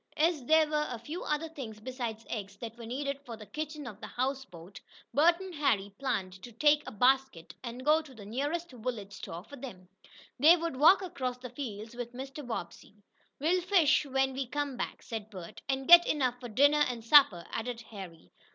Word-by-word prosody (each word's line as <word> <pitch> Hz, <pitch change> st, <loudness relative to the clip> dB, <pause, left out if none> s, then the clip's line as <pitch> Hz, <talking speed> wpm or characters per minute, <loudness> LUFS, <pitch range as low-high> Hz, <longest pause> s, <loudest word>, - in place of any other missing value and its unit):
As 315 Hz, -2 st, +2 dB
there 315 Hz, +2 st, +5 dB
were 300 Hz, 0 st, 0 dB
a 245 Hz, -, -4 dB
few 295 Hz, +10 st, -7 dB
other 300 Hz, +2 st, -1 dB
things 255 Hz, -9 st, -8 dB
besides 235 Hz, -2 st, -5 dB
eggs 200 Hz, -3 st, -5 dB
that 225 Hz, +1 st, -7 dB
were 235 Hz, -1 st, -9 dB
needed 280 Hz, +3 st, -3 dB
for 235 Hz, -4 st, -8 dB
the 215 Hz, -, -11 dB
kitchen 300 Hz, +6 st, -6 dB
of 215 Hz, -4 st, -9 dB
the -, -, -6 dB
houseboat, 240 Hz, -9 st, -4 dB, 0.3 s
Bert 340 Hz, +4 st, +5 dB
and 380 Hz, -1 st, -7 dB
Harry 210 Hz, -10 st, 0 dB
planned 195 Hz, -9 st, -2 dB
to 245 Hz, -, -10 dB
take 295 Hz, +5 st, +4 dB
a -, -, -5 dB
basket, 255 Hz, -5 st, +1 dB
and 245 Hz, +1 st, -7 dB
go 310 Hz, +2 st, +5 dB
to 285 Hz, -5 st, -15 dB
the 210 Hz, -3 st, -11 dB
nearest 290 Hz, +10 st, -3 dB
village 225 Hz, -5 st, -5 dB
store 170 Hz, -2 st, -7 dB
for 285 Hz, +7 st, -12 dB
them. 210 Hz, -9 st, -9 dB, 0.5 s
They 320 Hz, +6 st, +8 dB
would 330 Hz, -5 st, -3 dB
walk 360 Hz, +8 st, +6 dB
across 255 Hz, -8 st, -3 dB
the 250 Hz, -1 st, -9 dB
fields 225 Hz, -4 st, -6 dB
with 240 Hz, 0 st, -6 dB
Mr. 270 Hz, +3 st, -7 dB
Bobbsey. 225 Hz, -4 st, -6 dB, 0.4 s
"We'll 345 Hz, +6 st, +2 dB
fish 340 Hz, -5 st, +4 dB
when 270 Hz, 0 st, +1 dB
we 265 Hz, -1 st, -3 dB
come 290 Hz, 0 st, -2 dB
back," -, -, -5 dB
said 220 Hz, -2 st, -6 dB
Bert. 185 Hz, -5 st, -10 dB
"And 270 Hz, 0 st, -1 dB
get 345 Hz, 0 st, +9 dB
enough 255 Hz, -4 st, 0 dB
for 245 Hz, -1 st, -8 dB
dinner 285 Hz, +6 st, +4 dB
and 235 Hz, -2 st, -6 dB
supper," 230 Hz, -, +6 dB
added 230 Hz, +1 st, -4 dB
Harry. 175 Hz, -, -10 dB
255 Hz, 195 wpm, -30 LUFS, 225-295 Hz, 0.5 s, get